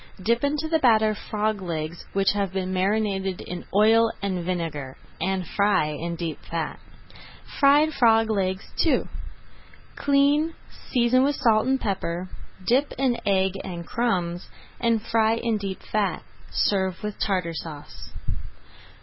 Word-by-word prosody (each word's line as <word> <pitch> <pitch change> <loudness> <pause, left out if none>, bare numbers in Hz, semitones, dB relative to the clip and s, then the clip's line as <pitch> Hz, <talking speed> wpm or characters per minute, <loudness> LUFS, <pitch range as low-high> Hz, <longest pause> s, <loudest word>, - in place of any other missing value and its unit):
Dip 230 +6 +1
into 300 +2 0
the 320 0 +2
batter 220 -5 +4
frog 210 0 -2
legs 165 -2 -4
which 195 0 +3
have 200 -2 -1
been 185 -1 -2
marinated 195 -1 0
in 180 -1 -7
oil 225 +3 +5
and 185 -3 -1
vinegar, 165 -7 -3 0.2
and 190 +1 0
fry 200 -3 +2
in 170 +3 -4
deep 165 -2 -4
fat. 165 -1 -4 0.8
FRIED 295 +2 +5
FROG 225 -3 +4
LEGS 190 -1 -1 0.2
II 325 - +3 0.9
Clean, 290 +3 +2 0.3
season 250 0 +3
with 285 +1 +2
salt 220 -2 +3
and 265 0 +2
pepper, 185 -4 -3 0.3
dip 260 +8 +2
in 255 -2 +2
egg 190 -1 +2
and 170 -2 -6
crumbs, 180 -8 -1 0.3
and 230 -2 +1
fry 225 0 +2
in 230 -1 0
deep 195 -2 -5
fat. 210 -2 -1 0.3
Serve 190 -2 0
with 210 -1 -4
Tartar 185 -5 0
Sauce. 150 -2 -8
200 Hz, 135 wpm, -25 LUFS, 180-230 Hz, 0.9 s, oil